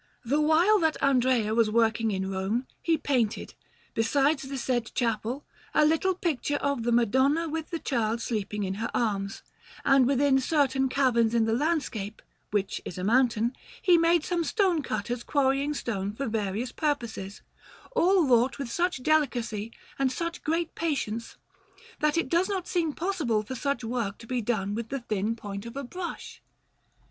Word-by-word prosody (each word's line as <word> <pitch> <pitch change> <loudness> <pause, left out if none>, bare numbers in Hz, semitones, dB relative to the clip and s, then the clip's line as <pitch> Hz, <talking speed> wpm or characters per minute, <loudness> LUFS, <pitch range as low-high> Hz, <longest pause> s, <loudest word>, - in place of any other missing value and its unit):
The 285 +6 +2
while 335 +8 +4
that 320 -3 +1
Andrea 250 -5 +2
was 225 -1 +3
working 225 0 +2
in 190 -1 -2
Rome, 195 +7 -1 0.2
he 330 -1 +2
painted, 250 -8 -1 0.4
besides 275 +6 +2
the 270 0 -5
said 240 -3 -1
chapel, 235 +3 -1 0.3
a 300 - +5
little 325 +5 +2
picture 300 -5 -1
of 280 -3 -1
the 240 +1 0
Madonna 260 +8 +3
with 320 0 -4
the 335 - -2
Child 230 -7 -1
sleeping 210 -3 -3
in 190 -1 -2
her - - -1
arms; 200 -4 -1 0.4
and 270 -2 +5
within 275 0 +3
certain 270 -2 +1
caverns 235 -4 +2
in 230 -1 +3
the 225 - +1
landscape, 250 -7 -1 0.3
which 200 -2 -1
is 180 - -7
a 180 - -4
mountain, 235 +1 +2 0.2
he 360 - +5
made 335 -1 +4
some 345 -1 0
stone 370 -3 +1
cutters 235 0 -3
quarrying 280 +1 +1
stone 205 -6 -3
for 275 +6 -3
various 220 +1 -2
purposes, 235 -10 -3 0.5
all 370 -5 +4
wrought 250 0 +3
with 275 -4 -5
such 345 -3 0
delicacy 240 -8 0 0.3
and 270 -1 +2
such 335 +4 -4
great 330 +1 -1
patience, 235 -8 -3 0.6
that 300 +1 +2
it 335 - +1
does 345 +4 +2
not 380 -3 -2
seem 335 -4 0
possible 295 - -1
for 235 - -6
such 280 0 -1
good 225 - -5
work 230 -5 -2
to 230 - -12
be 250 +1 -1
done 205 -3 -1
with 230 +1 -4
the 275 -1 -3
thin 215 -1 -1
point 205 -1 -7
of 235 - -8
a 280 - -3
brush. 350 +7 -7
255 Hz, 170 wpm, -27 LUFS, 225-300 Hz, 0.6 s, a